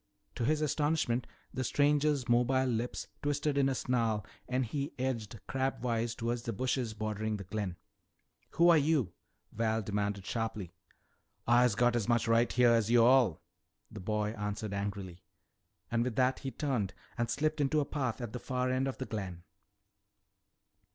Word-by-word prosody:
To 120 - -2
his 155 +3 +2
astonishment 150 -5 +1 0.3
the 130 - -2
stranger's 145 0 +2
mobile 125 +2 +3
lips 120 -1 -2
twisted 145 0 0
in 135 -1 +3
a 135 - -1
snarl 115 -5 0 0.2
and 130 0 +1
he 140 +5 -3
edged 120 -4 -3
crabwise 120 -3 -1
toward 120 +1 -2
the 115 0 -4
bushes 125 0 -1
bordering 110 0 -2
the 100 - -7
glen. 95 -1 -3 0.8
"Who 170 +1 +5
are 165 -2 +7
you?" 140 - +1 0.4
Val 110 0 0
demanded 100 -1 -2
sharply. 110 -6 -3 0.7
"Ah 120 +1 +5
has 125 -4 +4
got 120 +2 +3
as 115 -3 0
much 120 -1 +2
right 115 +1 +3
heah 120 -1 +5
as 115 -2 +2
yo' 120 -1 +6
all," 120 - +4 0.5
the 105 - -8
boy 105 +2 -1
answered 105 -1 -4
angrily. 100 -3 -4 0.7
And 115 0 +2
with 125 -2 -2
that 130 +1 +2
he 135 - -4
turned 125 -7 -2 0.2
and 120 -1 -1
slipped 155 +2 0
into 145 +2 +2
a 145 - +1
path 130 -4 -2
at 120 -3 -5
the 125 - -4
far 130 0 -1
end 130 +1 +1
of 135 - -4
the 130 - -4
glen. 95 -7 -5
120 Hz, 165 wpm, -32 LUFS, 110-130 Hz, 0.8 s, are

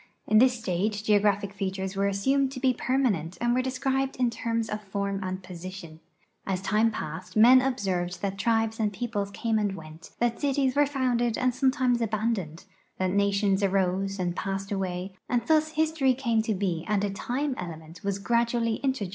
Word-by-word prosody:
In 215 - +5
this 250 0 +4
stage 205 0 -1
geograj)hic 205 -1 +2
features 190 -1 -3
were 200 +1 +1
assumed 265 +8 +1
to 255 - -6
be 260 0 +3
j)ermanent 225 - 0
and 240 0 +1
were 255 - +2
described 265 +1 -1
in 250 -2 +1
terms 230 -1 -2
of 210 -1 -4
form 200 0 -3
and 185 0 -4
position. 180 -2 -9 0.4
As 190 -2 -2
time 210 +4 +2
passed 170 -2 -6
men 250 +4 +8
observed 190 -9 -1
that 195 -1 -2
tribes 225 0 +1
and 215 -2 +1
peoples 205 -1 -3
came 220 +2 -1
and 205 -2 -1
went, 160 0 -11
that 235 -1 0
cities 275 -2 +1
were 290 0 +4
founded 245 -4 0
and 255 0 +1
sometimes 255 -2 +2
abandoned, 215 -7 -2 0.3
that 185 -1 0
nations 200 0 +2
arose 195 0 +1
and 175 -2 -2
))assed 195 +1 -3
away; 185 -1 -3 0.2
and 240 -2 +1
thus 310 +1 +2
history 310 -4 +2
came 235 -4 +1
to 220 0 -1
Ije 180 -4 -1
and 210 -1 +1
a 205 - 0
time 260 +8 -2
element 165 -1 -8
was 200 -1 -1
gradually 235 +1 +1
introduced - - -19
into 265 0 +1
geography. 195 - -2
210 Hz, 185 wpm, -27 LUFS, 190-245 Hz, 0.4 s, men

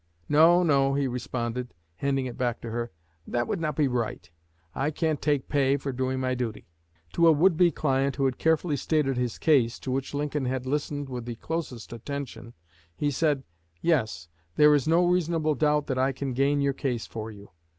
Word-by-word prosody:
"No, 165 +4 +6
no," 135 -4 +3
he 140 -1 +1
responded, 125 0 -4 0.2
handing 135 -1 0
it 125 - -5
back 120 -3 -1
to 115 - -6
her; 120 +1 -3 0.4
"that 120 0 -1
would 195 - -2
not 155 -2 -1
be 150 -3 +2
right. 120 -7 -3 0.4
I 140 +2 0
can't 155 -1 -1
take 145 -3 0
pay 140 -1 +2
for 135 0 -4
doing 130 +1 -2
my 130 0 0
duty." 120 -3 -4 0.5
To 170 0 +4
a - - +8
would 165 +4 +4
be 175 +2 +5
client 135 -3 0
who 135 - 0
had 130 -2 -1
carefully 160 -1 +2
stated 140 -1 +1
his 125 -2 -2
case, 130 -7 +3
to 130 - -4
which 135 +2 -2
Lincoln 145 -1 -1
had 130 0 -2
listened 145 +1 -2
with 125 -3 -6
the 120 -1 -5
closest 130 -4 -5
attention, 120 -2 -7 0.4
he 145 - 0
said: 145 -1 +1 0.4
"Yes, 110 - 0 0.3
there 150 0 +6
is 145 -2 +2
no 170 +2 +4
reasonable 170 -3 +1
doubt 150 +1 +2
that 130 -2 -2
I 135 +1 +2
can 135 -1 -4
gain 140 +3 +2
your 140 0 +1
case 125 -4 -2
for 110 -1 -6
you. 100 -2 -13
135 Hz, 195 wpm, -27 LUFS, 125-150 Hz, 0.5 s, a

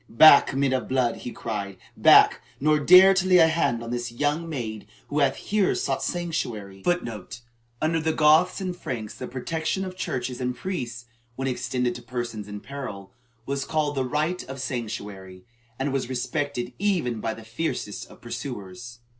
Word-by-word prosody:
"Back, 140 +2 +7
men 135 -1 +2
of 130 - -1
blood!" 130 -3 +1
he 120 - -7
cried. 100 -5 -5 0.2
"Back! - - +6 0.2
Nor 150 +2 +3
dare 185 +5 +8
to 190 -1 +1
lay 185 - +5
hand 160 -8 +3
on 115 - -6
this 120 -1 -3
young 145 +6 -1
maid 110 -8 -5 0.2
who 145 - 0
hath 140 -2 +3
here 205 -2 +1
sought - - -1
sanctuary!"(1) 140 - -2
(1) 110 -5 -7 0.6
Under 165 +1 +2
the 160 0 0
Goths 160 +5 +4
and 185 -2 -3
Franks 115 -10 -5
the 125 - -7
protection 160 +8 -2
of 185 0 -7
churches 125 -7 -3
and 125 0 -1
priests, 120 -11 -5 0.3
when 135 +1 -3
extended 125 -1 -1
to 120 - -9
persons 120 -3 -5
in 105 0 -7
peril, 125 -8 -7 0.3
was 140 +1 -2
called 150 -1 0
the 135 -2 0
"right 150 +7 -1
of 135 +1 -8
sanctuary," 105 -7 -5 0.3
and 135 +1 -1
was 135 -2 -1
respected 130 0 -2
even 175 - 0
by 110 - -2
the 110 - -12
fiercest 115 -3 -4
of - - -16
pursuers. 115 +5 -7
130 Hz, 170 wpm, -25 LUFS, 115-155 Hz, 0.6 s, dare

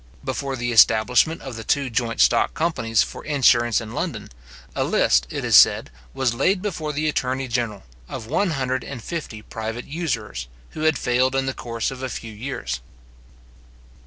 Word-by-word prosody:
Before 135 0 -3
the 120 -1 -2
establishment 120 +7 +4
of 130 -3 -7
the 110 - -6
two 140 +3 +1
joint 115 0 0
stock - - +3
companies 115 -10 +1
for - - -8
insurance 120 -6 +3
in 115 -2 -8
London, - - -4 0.4
a - - +1
list, - - +3
it - - -4
is - - +3
said, - - +6 0.2
was 130 -3 +1
laid 185 +11 +2
before 170 -6 -3
the 150 +1 -1
attorney 130 -2 -1
general, 115 -4 -2 0.3
of 110 - -6
one 190 - +1
hundred 130 -1 -1
and 125 -5 -7
fifty 150 -11 -6
private 110 +2 -5
usurers, 115 - -3 0.2
who - - -9
had 160 -3 +3
failed 125 +3 +1
in 135 0 +1
the 135 - -1
course 115 -1 -3
of 130 -1 -8
a 130 - -3
few 115 -1 -7
years. 105 - -4
125 Hz, 175 wpm, -23 LUFS, 115-140 Hz, 0.4 s, said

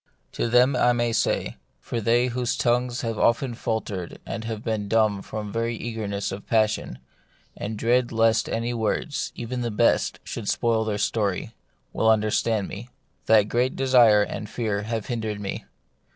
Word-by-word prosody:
To - - -2
them 125 +3 +4
I 125 0 +4
may 120 -1 0
say 110 - 0
— - - -44
for 115 - -4
they 120 +3 +3
whose 125 0 -1
tongues 125 0 +1
have 115 -3 -3
often 120 +2 +2
faltered 105 -6 -4
and 110 0 -5
been 110 -3 -2
dumb 110 -2 +2
from 105 0 -6
very 115 +1 -1
eagerness 105 -4 -4
of 95 +1 -7
passion, 110 - +1 0.6
and 105 +1 -5
dread 120 +2 +2
lest 115 -1 +2
any 115 +1 -1
words, 115 +6 -2
even 125 +1 -4
the 120 - -1
best, 115 +2 +2
should - - -5
spoil 115 -1 +1
their 105 -2 -1
story, 100 -2 -1 0.4
will 110 - +2
understand 110 -1 +2
me 115 +5 -8 0.2
— - - -43
that 110 -2 +6
great 120 +5 0
desire 120 -6 +5
and 105 0 -5
fear 105 -4 -2
have 110 0 -3
hindered 110 -3 -3
me. 100 -1 -5
115 Hz, 165 wpm, -25 LUFS, 105-120 Hz, 0.6 s, that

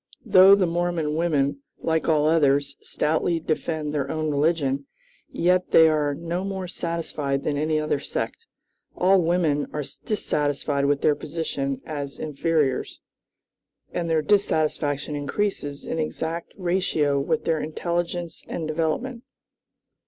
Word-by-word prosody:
Though 195 -2 +8
the 195 -2 +2
Mormon 170 -3 -1
women, 145 -4 +1 0.2
like 160 0 0
all 150 -1 +3
others, 140 -3 +3
stoutly 160 +2 0
defend 155 -1 -2
their 140 -2 -1
own 155 -1 -1
religion, 140 -2 +1 0.4
yet 180 +1 +1
they 160 - +7
are 150 -2 +1
no 170 +3 -3
more 190 -2 -4
satisfied 155 -6 -3
than 150 - -1
any 155 +1 +1
other 150 -2 0
sect. 460 - -4 0.5
All 190 +1 +4
women 165 -4 +1
are 150 - -2 0.2
dissatisfied 145 -7 0
with 140 0 +1
their 150 - +4
position 145 -4 -3
as 145 -3 -5
inferiors, 150 -2 -1 0.9
and 170 -1 -2
their 160 -1 +2
dissatisfaction 155 -7 +1
increases 145 -1 -2
in 165 - -3
exact 160 +2 -3
ratio 175 -6 +1
with 230 +12 -1
their 160 -1 +1
intelligence 170 +2 -3
and 160 -2 -4
development. 165 +11 -2
155 Hz, 130 wpm, -24 LUFS, 145-170 Hz, 0.9 s, Though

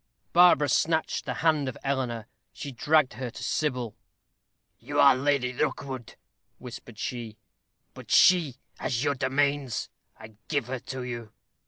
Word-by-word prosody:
Barbara 175 -4 +6
snatched 160 +4 +1
the - - -3
hand 150 -4 +3
of - - -8
Eleanor. 125 -5 -2 0.3
She 140 - -7
dragged 150 +2 +2
her 125 0 -5
to - - -9
Sybil. 125 -7 -1 0.8
"You 145 0 -3
are 140 -2 +7
Lady 130 -2 +1
Rookwood," 130 -2 -3 0.4
whispered 120 -2 -10
she; 115 -2 -5 0.6
"but - - -12
she 170 -8 +5 0.2
has 120 +1 -1
your 145 -1 +2
domains. 140 0 0 0.3
I 110 -1 -13
give 145 -6 0
her 130 -1 -3
to 130 +1 -6
you." 120 -3 -6
130 Hz, 140 wpm, -27 LUFS, 120-145 Hz, 0.8 s, are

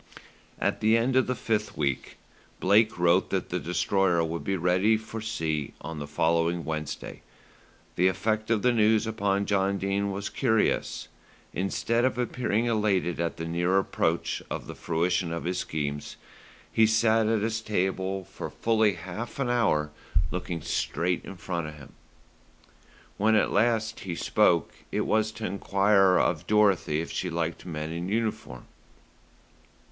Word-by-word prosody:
At - - 0
the 110 +1 +4
end 125 +3 +1
of 130 - +4
the 130 - 0
fifth 110 -2 -2
week 70 -4 -2 0.4
Blake 110 +3 +3
wrote 90 +1 +3
that 95 -2 -2
the 90 - -1
Destroyer 90 +1 +1
would 80 -1 -3
be 95 +3 -1
ready 95 +6 +3
for 110 0 -7
sea 80 -9 -2
on 80 +1 -6
the 75 - -5
following 85 +2 +1
Wednesday. 75 -1 -5 0.7
The 90 - +3
effect 110 +4 0
of 110 -3 +1
the 125 - +4
news 110 -1 +3
upon 100 -3 0
John 100 -1 +1
Dene 100 +1 -1
was 100 +1 -3
curious. 115 -5 0 0.5
Instead 115 +5 0
of 130 -2 +1
appearing 120 -2 0
elated 105 -7 +1
at 85 0 -2
the 80 - -4
near 85 +3 +1
approach 85 -3 0
of - - -4
the - - -7
fruition 85 +1 0
of 85 - -3
his 90 +1 -1
schemes, 75 -1 -4 0.6
he 110 -1 +5
sat 110 0 +3
at 110 -2 +1
his 110 0 -1
table 95 -2 -1
for 95 +1 -7
fully 110 -2 +2
half 95 +7 -7
an 135 -3 0
hour 75 -11 +1 0.4
looking 90 -3 -4
straight 90 +1 -1
in 95 - -8
front 85 -2 -3
of 75 - -8
him. 70 -2 -14 1.2
When 110 +2 +3
at 105 - +2
last 110 0 +1
he 90 -3 -5
spoke, 85 -2 +2 0.2
it - - 0
was 110 0 +1
to 110 -1 -5
enquire 100 -1 +3
of 85 0 0
Dorothy 100 -7 +3
if 85 - -6
she 90 - -2
liked 85 +1 -3
men 80 -1 -4
in 85 +2 -4
uniform. 105 - -3
95 Hz, 155 wpm, -27 LUFS, 85-110 Hz, 1.2 s, he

